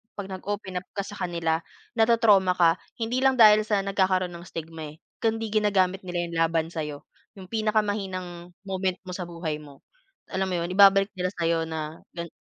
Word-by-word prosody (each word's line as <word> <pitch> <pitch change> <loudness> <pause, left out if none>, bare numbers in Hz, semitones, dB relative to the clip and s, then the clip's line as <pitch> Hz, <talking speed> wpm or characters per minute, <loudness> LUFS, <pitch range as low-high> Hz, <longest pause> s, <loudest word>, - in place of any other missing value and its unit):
'pag 200 -1 -6
nag 190 -1 -7
open 200 -3 -3
up 180 - -5
ka 200 - -2
sa 205 - -9
kanila 170 -3 0 0.4
na-to-trauma 220 -5 +5
ka 170 -1 +4 0.2
hindi 235 +3 -1
lang 265 0 +4
dahil 215 -1 +7
sa 205 -2 +1
nagkakaroon 185 -2 +1
ng 170 +1 -9
stigma, 160 -2 -7
eh, - - -17 0.3
kung 225 -1 +1
hindi 220 - -3
ginagamit 195 -3 +2
nila 175 -1 -4
'yun 170 - -9
laban 165 0 +2
sa'yo 150 -4 -5 0.4
yung 185 - -10
pinakamahinang 195 -5 -2 0.2
moment 190 -1 -1
mo 180 - -5
sa 180 - -4
buhay 165 -3 -4
mo. 145 -2 -14 0.6
Alam 190 0 0
mo - - 0
'yon 170 - -3
ibabalik 195 0 +7
nila 180 0 -1
sa'yo 165 -1 0
na 160 0 -5
gan 170 0 -5
185 Hz, 190 wpm, -26 LUFS, 170-205 Hz, 0.6 s, dahil